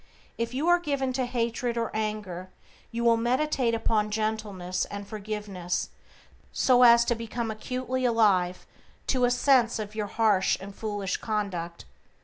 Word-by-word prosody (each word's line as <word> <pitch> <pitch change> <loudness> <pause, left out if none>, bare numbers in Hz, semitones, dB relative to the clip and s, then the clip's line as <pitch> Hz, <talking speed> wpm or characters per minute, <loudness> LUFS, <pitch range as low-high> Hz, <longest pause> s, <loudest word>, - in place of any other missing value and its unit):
If 230 +2 -3
you 295 +5 -1
are 350 0 +5
given 280 -5 -1
to 255 0 0
hatred 235 0 -1
or 230 -1 -1
anger 210 -4 -3 0.4
you 235 +1 -3
will 230 -1 +5
meditate 250 0 +1
upon 220 -2 +1
gentleness 210 -4 -2
and 205 0 -7
forgiveness, 205 -4 -4 0.6
so 250 -1 +3
as 235 -1 +7
to 240 - +2
become 230 0 -4
acutely 255 +3 -3
alive 200 -7 +2 0.4
to 255 -2 +2
a - - +3
sense 245 -1 +3
of 215 -1 -5
your 215 -1 -3
harsh 210 -3 +2
and 195 +1 -9
foolish 205 -3 -3
conduct. 190 - -3
225 Hz, 145 wpm, -27 LUFS, 205-245 Hz, 0.6 s, as